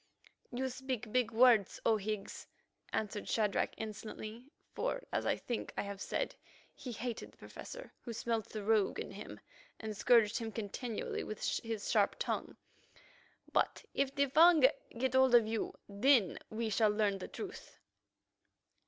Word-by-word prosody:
"You 255 Hz, +2 st, -1 dB
speak 255 Hz, -3 st, -4 dB
big 250 Hz, -2 st, +2 dB
words, 230 Hz, -3 st, +5 dB
O 225 Hz, -, +5 dB
Higgs," 210 Hz, 0 st, -4 dB, 0.4 s
answered 210 Hz, -1 st, -2 dB
Shadrach 210 Hz, -3 st, +1 dB
insolently, 220 Hz, +2 st, -7 dB, 0.3 s
for, -, -, -2 dB
as -, -, 0 dB
I -, -, +3 dB
think 240 Hz, -, -4 dB
I -, -, 0 dB
have 200 Hz, -1 st, -6 dB
said, -, -, -2 dB, 0.4 s
he 250 Hz, -, -7 dB
hated 235 Hz, 0 st, -5 dB
the -, -, -25 dB
Professor, -, -, -9 dB
who 240 Hz, -, -6 dB
smelt 230 Hz, -1 st, -2 dB
the 215 Hz, -2 st, -5 dB
rogue 215 Hz, -1 st, +2 dB
in -, -, -5 dB
him, 205 Hz, +2 st, -8 dB, 0.4 s
and 220 Hz, -1 st, -5 dB
scourged 230 Hz, 0 st, +4 dB
him 225 Hz, -1 st, -4 dB
continually 225 Hz, +2 st, -4 dB
with 215 Hz, -, -5 dB, 0.2 s
his 225 Hz, -3 st, -4 dB
sharp -, -, +3 dB
tongue, -, -, -3 dB, 1.0 s
"but -, -, +1 dB
if 275 Hz, 0 st, 0 dB
the 280 Hz, -1 st, +4 dB
Fung 320 Hz, +4 st, +6 dB, 0.4 s
get 260 Hz, +1 st, 0 dB
hold 260 Hz, -1 st, +6 dB
of 235 Hz, -2 st, +7 dB
you, 220 Hz, 0 st, -2 dB
then 205 Hz, 0 st, +3 dB
we 220 Hz, 0 st, -2 dB
shall 215 Hz, +1 st, +4 dB
learn 210 Hz, -2 st, +1 dB
the -, -, -6 dB
truth." 415 Hz, 0 st, -8 dB
225 Hz, 155 wpm, -34 LUFS, 210-255 Hz, 1.0 s, of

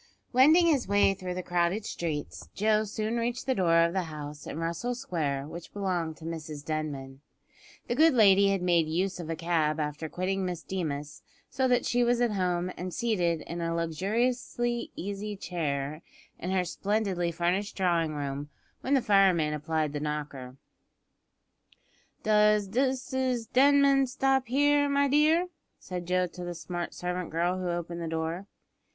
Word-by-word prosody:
Wending 310 Hz, +8 st, +6 dB
his 290 Hz, -, +2 dB
way 200 Hz, 0 st, +4 dB
through 180 Hz, -1 st, -5 dB
the 185 Hz, -, -4 dB
crowded 175 Hz, +4 st, 0 dB
streets, 155 Hz, -7 st, -4 dB
Joe 215 Hz, +1 st, +2 dB
soon 215 Hz, +2 st, -2 dB
reached 235 Hz, +1 st, -2 dB
the 265 Hz, -, +2 dB
door 170 Hz, -5 st, +3 dB
of 170 Hz, -, -2 dB
the 190 Hz, -2 st, 0 dB
house 150 Hz, -2 st, -8 dB
in -, -, -5 dB
Russell 170 Hz, +10 st, -2 dB
Square 145 Hz, -, -2 dB
which 165 Hz, +2 st, -9 dB
belonged 180 Hz, -5 st, -2 dB
to 160 Hz, -, -11 dB
Mrs 155 Hz, -3 st, -6 dB
Denman. 140 Hz, -4 st, -4 dB, 0.6 s
The -, -, -1 dB
good 315 Hz, +2 st, +5 dB
lady 200 Hz, -3 st, +6 dB
had 195 Hz, -2 st, 0 dB
made 170 Hz, -3 st, +3 dB
use 180 Hz, +4 st, -1 dB
of 165 Hz, -2 st, -6 dB
a 165 Hz, -, -1 dB
cab 160 Hz, -2 st, 0 dB
after 150 Hz, +1 st, -3 dB
quitting 190 Hz, +3 st, -2 dB
Miss 180 Hz, -3 st, -3 dB
Deemas, 150 Hz, -5 st, -4 dB, 0.3 s
so 260 Hz, 0 st, +1 dB
that 245 Hz, -1 st, +2 dB
she 245 Hz, 0 st, +2 dB
was 240 Hz, 0 st, +2 dB
at 240 Hz, -2 st, +2 dB
home 180 Hz, -2 st, 0 dB
and 180 Hz, +1 st, -5 dB
seated 175 Hz, -8 st, 0 dB
in 170 Hz, 0 st, -6 dB
a 165 Hz, 0 st, -1 dB
luxuriously 235 Hz, +8 st, -1 dB
easy 205 Hz, +2 st, -4 dB
chair 155 Hz, -5 st, -3 dB, 0.4 s
in 180 Hz, -, -4 dB
her 185 Hz, -1 st, +1 dB
splendidly 195 Hz, -3 st, -1 dB
furnished 180 Hz, +4 st, -1 dB
drawing 170 Hz, -4 st, +1 dB
room 145 Hz, 0 st, -4 dB, 0.3 s
when 275 Hz, +2 st, +1 dB
the 265 Hz, -, +2 dB
fireman 185 Hz, -7 st, +4 dB
applied 150 Hz, 0 st, -1 dB
the 145 Hz, -, -2 dB
knocker. 145 Hz, -4 st, -5 dB, 1.7 s
"Does 210 Hz, -1 st, +4 dB
Mrs 260 Hz, 0 st, -1 dB
Denman 275 Hz, 0 st, +5 dB
stop 265 Hz, 0 st, +1 dB
here, 285 Hz, +3 st, +3 dB
my 280 Hz, 0 st, +3 dB
dear?" 310 Hz, +5 st, +3 dB, 0.3 s
said 180 Hz, -2 st, -6 dB
Joe 180 Hz, 0 st, +2 dB
to 180 Hz, 0 st, -8 dB
the 175 Hz, 0 st, -5 dB
smart 175 Hz, 0 st, -5 dB
servant 180 Hz, -1 st, -3 dB
girl 175 Hz, +3 st, 0 dB
who 180 Hz, -1 st, -2 dB
opened 170 Hz, 0 st, -3 dB
the 165 Hz, -, -3 dB
door. 165 Hz, +4 st, -3 dB
180 Hz, 165 wpm, -28 LUFS, 165-225 Hz, 1.7 s, Wending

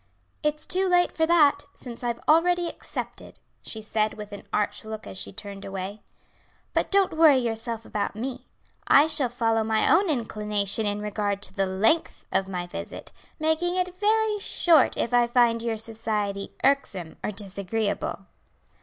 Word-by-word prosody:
"It's 300 Hz, 0 st, 0 dB
too 375 Hz, +1 st, +2 dB
late 355 Hz, -1 st, +3 dB
for 320 Hz, 0 st, 0 dB
that, 295 Hz, -4 st, +4 dB
since 245 Hz, -1 st, -9 dB
I -, -, -1 dB
have 235 Hz, 0 st, -2 dB
already 345 Hz, +2 st, +4 dB
accepted," -, -, -7 dB, 0.2 s
she 220 Hz, -1 st, -6 dB
said 215 Hz, 0 st, -1 dB
with 210 Hz, -1 st, -9 dB
an 205 Hz, -, -9 dB
arch 205 Hz, 0 st, -1 dB
look 220 Hz, 0 st, -7 dB
as -, -, -8 dB
she -, -, -3 dB
turned 200 Hz, -1 st, -8 dB
away. 195 Hz, +2 st, -6 dB, 0.7 s
"But -, -, 0 dB
don't 395 Hz, -3 st, +3 dB
worry 315 Hz, -4 st, +6 dB
yourself 230 Hz, -1 st, -2 dB
about 205 Hz, -1 st, -3 dB
me; 250 Hz, +3 st, -5 dB, 0.4 s
I 285 Hz, -, +7 dB
shall 285 Hz, -5 st, +2 dB
follow 225 Hz, -2 st, +1 dB
my 220 Hz, 0 st, +1 dB
own 380 Hz, +2 st, +4 dB
inclination 210 Hz, -5 st, -1 dB
in 205 Hz, 0 st, -2 dB
regard 205 Hz, -1 st, -2 dB
to -, -, -2 dB
the 195 Hz, -1 st, 0 dB
length 220 Hz, -, +1 dB
of 195 Hz, 0 st, 0 dB
my 180 Hz, -2 st, -3 dB
visit, 175 Hz, -, -8 dB, 0.3 s
making 320 Hz, +3 st, +1 dB
it 365 Hz, -1 st, 0 dB
very 425 Hz, +2 st, +1 dB
short 345 Hz, -4 st, +4 dB
if 235 Hz, -, -1 dB
I 240 Hz, -1 st, +4 dB
find 235 Hz, -1 st, +3 dB
your 230 Hz, -1 st, -2 dB
society 215 Hz, -3 st, -2 dB
irksome 205 Hz, -12 st, 0 dB
or -, -, -1 dB
disagreeable." 200 Hz, 0 st, -3 dB
225 Hz, 165 wpm, -25 LUFS, 205-310 Hz, 0.7 s, I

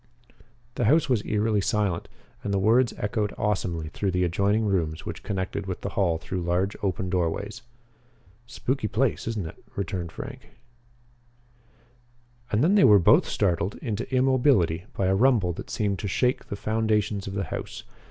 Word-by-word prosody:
The 120 Hz, -, -1 dB
house 145 Hz, +5 st, +4 dB
was 120 Hz, -5 st, +2 dB
eerily 105 Hz, 0 st, +1 dB
silent 100 Hz, -3 st, 0 dB, 0.4 s
and 100 Hz, -, -2 dB
the 100 Hz, -, +1 dB
words 115 Hz, +5 st, +3 dB
echoed 105 Hz, 0 st, -2 dB
awesomely 90 Hz, -6 st, -1 dB
through 100 Hz, +4 st, -2 dB
the 90 Hz, 0 st, +1 dB
adjoining 100 Hz, +5 st, +1 dB
rooms 85 Hz, -6 st, -1 dB
which -, -, -6 dB
connected 95 Hz, 0 st, -3 dB
with 90 Hz, -, -4 dB
the 100 Hz, -, -3 dB
hall 90 Hz, -5 st, +1 dB
through 90 Hz, +3 st, -4 dB
large 90 Hz, +4 st, 0 dB
open 95 Hz, -1 st, -1 dB
doorways. 95 Hz, +5 st, -2 dB, 0.9 s
"Spooky 125 Hz, 0 st, -2 dB
place, 120 Hz, +2 st, 0 dB
isn't 110 Hz, -6 st, -2 dB
it?" 80 Hz, -, -10 dB
returned 95 Hz, -4 st, -3 dB
Frank. 135 Hz, -, -9 dB, 2.0 s
And 110 Hz, +4 st, +2 dB
then 175 Hz, +5 st, +4 dB
they 205 Hz, -, +5 dB
were 105 Hz, -, +8 dB
both 85 Hz, -, +5 dB
startled 90 Hz, +3 st, 0 dB
into 115 Hz, +3 st, -4 dB
immobility 130 Hz, -, +3 dB
by 95 Hz, -, +1 dB
a 95 Hz, -, +3 dB
rumble 105 Hz, -5 st, +3 dB
that -, -, -8 dB
seemed 100 Hz, -3 st, -1 dB
to 100 Hz, -, -3 dB
shake 125 Hz, +7 st, 0 dB
the -, -, -4 dB
foundations 110 Hz, -1 st, 0 dB
of 95 Hz, -, -5 dB
the 100 Hz, -, -1 dB
house. -, -, -6 dB
100 Hz, 160 wpm, -26 LUFS, 95-115 Hz, 2.0 s, were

